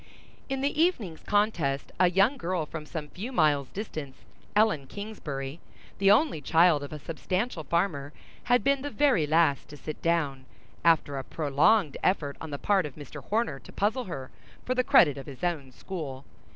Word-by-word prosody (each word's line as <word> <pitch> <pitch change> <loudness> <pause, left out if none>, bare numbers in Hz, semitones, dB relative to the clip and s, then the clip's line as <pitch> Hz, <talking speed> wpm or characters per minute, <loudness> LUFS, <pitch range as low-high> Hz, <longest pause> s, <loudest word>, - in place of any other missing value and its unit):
In 270 0 -2
the 285 +3 0
evening's 220 - +1
contest 170 -10 0
a 180 -1 +5
young 195 +9 +3
girl 180 - -2
from 150 0 -7
some 155 -2 -5
few 210 - -6
miles' 150 - +2
distance, 155 -10 -6 0.4
Ellen 210 -11 +3
Kingsbury, 155 -9 -6 0.4
the 195 0 +4
only 215 - +4
child 165 0 +4
of 145 - -7
a 155 - -5
substantial 180 +5 -3
farmer, 150 -3 -1 0.3
had 245 0 +3
been 275 0 +2
the 290 - -3
very 275 - +2
last 155 -3 +2
to 150 - -11
sit 155 +1 -7
down, 145 -6 0 0.4
after 155 -4 +3
a - - -5
prolonged 150 +5 +2
effort 145 -7 +1
on 160 - -6
the 145 - -4
part 195 0 +2
of 140 - -13
Mr. 145 -4 -10
Horner 210 -10 -1
to - - -14
puzzle 220 +5 0
her, 135 -8 -7 0.3
for 255 - 0
the 255 0 +1
credit 180 - +5
of 135 - -10
his 140 +3 -10
own 155 -7 -2
school. 140 -3 -7
165 Hz, 180 wpm, -28 LUFS, 145-210 Hz, 0.4 s, a